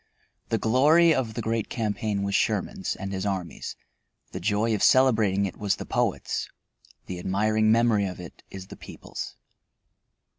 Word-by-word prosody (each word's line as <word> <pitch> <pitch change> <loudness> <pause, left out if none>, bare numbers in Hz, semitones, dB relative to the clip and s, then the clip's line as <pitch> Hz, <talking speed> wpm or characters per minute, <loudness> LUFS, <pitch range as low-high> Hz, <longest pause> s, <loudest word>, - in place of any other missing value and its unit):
The 115 - +1
glory 150 +10 +5
of 115 -6 -2
the - - -3
great 115 0 -1
campaign 105 -2 -2
was 100 0 -2
Sherman's 100 -2 0
and 95 0 -6
his 95 -1 -3
army's; 95 -4 -4 0.6
the 95 - -5
joy 105 +4 +1
of 105 - -1
celebrating 110 -7 +4
it 95 - -5
was 100 -2 0
the - - -7
poet's; - - -1 0.6
the 90 -1 -6
admiring 110 +4 +2
memory 115 -3 +3
of 90 - -7
it 90 -2 -10
is 95 -1 -8
the - - -9
people's. - - -8
105 Hz, 155 wpm, -26 LUFS, 95-115 Hz, 0.6 s, glory